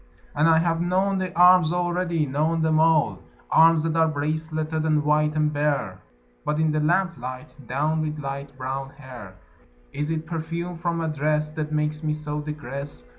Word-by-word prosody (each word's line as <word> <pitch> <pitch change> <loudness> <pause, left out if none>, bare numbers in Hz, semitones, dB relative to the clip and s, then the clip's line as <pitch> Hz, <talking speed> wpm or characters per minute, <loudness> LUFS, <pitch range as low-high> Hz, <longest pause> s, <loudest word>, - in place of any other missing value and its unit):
And 155 +3 +3
I 160 - +5
have 165 0 +1
known 190 +2 +1
the 185 -1 -3
arms 180 -2 +6
already, 175 -2 0
known 155 +4 0
them 160 -1 +2
all 160 -2 +3 0.3
Arms 160 -1 +5
that 165 0 -1
are 160 -1 +3
braceleted 155 +1 -2
and 155 -2 +2
white 150 +1 +2
and 150 -1 +1
bare 145 -11 -1 0.4
[But 150 +1 -1
in 160 -1 +2
the 155 - 0
lamplight, 150 -6 -1
downed 150 +5 0
with 155 0 -3
light 140 -1 -6
brown 135 +1 -4
hair!] 130 -9 -11 0.6
Is 150 +1 -3
it 160 -1 -2
perfume 165 +1 -4
from 170 -1 -1
a 165 - -1
dress 150 0 0
That 155 -1 -4
makes 150 0 -1
me 155 -1 -1
so 150 0 -4
digress? 140 - -6
155 Hz, 175 wpm, -24 LUFS, 150-165 Hz, 0.6 s, arms